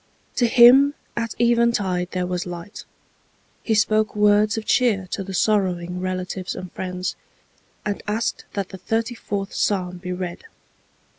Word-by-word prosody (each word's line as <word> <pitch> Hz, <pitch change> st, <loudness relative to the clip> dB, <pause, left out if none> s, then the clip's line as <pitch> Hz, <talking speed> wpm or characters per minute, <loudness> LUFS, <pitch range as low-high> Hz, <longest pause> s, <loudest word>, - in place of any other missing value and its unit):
To 240 Hz, -, +4 dB
him 255 Hz, +5 st, +7 dB, 0.2 s
at 230 Hz, -2 st, -3 dB
even 235 Hz, 0 st, +4 dB
tide 185 Hz, -5 st, -1 dB
there 180 Hz, -1 st, -2 dB
was 180 Hz, 0 st, -3 dB
light. 175 Hz, +3 st, -8 dB, 0.8 s
He 220 Hz, -, 0 dB
spoke 215 Hz, 0 st, +2 dB
words 210 Hz, +1 st, +3 dB
of 220 Hz, -, -4 dB
cheer 215 Hz, -7 st, +2 dB
to 195 Hz, -, -2 dB
the 190 Hz, 0 st, -6 dB
sorrowing 180 Hz, -3 st, +1 dB
relatives 185 Hz, 0 st, -3 dB
and 185 Hz, -1 st, -7 dB
friends, 185 Hz, 0 st, -4 dB, 0.7 s
and 205 Hz, -1 st, -2 dB
asked 215 Hz, +2 st, -2 dB
that 200 Hz, -2 st, -3 dB
the 190 Hz, -, -9 dB
thirty 225 Hz, +6 st, -1 dB
fourth 200 Hz, -4 st, -4 dB
psalm 180 Hz, -3 st, 0 dB
be 180 Hz, 0 st, -6 dB
read." 180 Hz, -1 st, -5 dB
200 Hz, 150 wpm, -22 LUFS, 180-220 Hz, 0.8 s, him